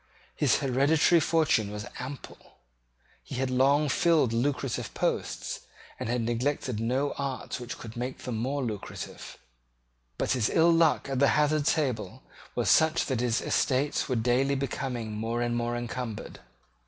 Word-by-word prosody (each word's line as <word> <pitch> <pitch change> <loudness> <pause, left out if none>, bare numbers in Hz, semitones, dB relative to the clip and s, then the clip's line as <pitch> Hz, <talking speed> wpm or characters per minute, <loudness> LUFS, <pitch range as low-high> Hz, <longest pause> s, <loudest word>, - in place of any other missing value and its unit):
His - - +3
hereditary 145 +6 +4
fortune 155 -12 +2
was 105 0 -6
ample. 130 +2 -9 0.6
He - - -8
had 130 0 -1
long 140 +4 +3
filled 155 -5 +3
lucrative 130 0 -1
posts, - - -2 0.4
and - - -3
had 120 0 0
neglected 120 0 -1
no 130 +5 0
art 135 -2 -3
which 120 0 -6
could 115 -1 -9
make 125 +2 -4
them 125 -3 -3
more 130 +5 -1
lucrative: 110 -5 -6 0.8
but - - 0
his 125 -5 +2
ill 165 +1 +4
luck 165 -2 +3
at 135 -2 -2
the 140 - +5
hazard 150 0 +2
table 125 - -1 0.3
was - - 0
such 160 +1 +4
that 130 -4 -1
his 120 -1 +1
estates 140 +3 0
were 130 - +1
daily 125 +4 +2
becoming 130 -4 -3
more 115 +2 -2
and 120 0 -1
more 120 0 -1
encumbered. 120 -2 -5
130 Hz, 150 wpm, -28 LUFS, 120-145 Hz, 0.8 s, the